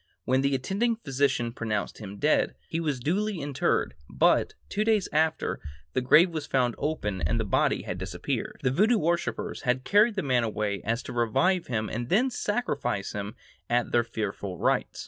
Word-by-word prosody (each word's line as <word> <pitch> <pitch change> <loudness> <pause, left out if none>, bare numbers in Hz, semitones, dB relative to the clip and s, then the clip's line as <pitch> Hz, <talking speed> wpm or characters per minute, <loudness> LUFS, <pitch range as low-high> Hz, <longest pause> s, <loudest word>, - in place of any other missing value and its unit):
When 130 +1 +2
the 140 0 +2
attending 200 - 0
physician 135 - 0
pronounced 110 -4 -3
him 100 -2 -8
dead, 150 +8 +2
he 165 - -2
was 150 -6 -1
duly 195 - 0
interred; 140 - 0 0.2
but, - - +2
two 210 - -1
days 215 -4 +2
after, 155 +1 +1 0.3
the - - +1
grave 160 +8 +6
was 155 -2 -4
found 125 -3 +1
open 105 - -2
and 80 - 0
the - - 0
body - - +1
had - - -5
disappeared. - - -4
The 125 - +2
Voodoo 215 - +3
worshippers 170 -1 -1
had 125 +1 0
carried 210 - +4
the 190 - -1
man 125 -3 +2
away 105 -2 -1
so - - -16
as 115 +2 0
to - - -7
revive 165 - +1
him 110 -3 -1
and 120 +3 -4
then 250 +8 +3
sacrifice 145 - -2
him 100 +1 -5 0.3
at 120 0 +1
their 120 - +3
fearful 100 -4 -4
rites. - - 0
130 Hz, 185 wpm, -27 LUFS, 115-175 Hz, 0.3 s, grave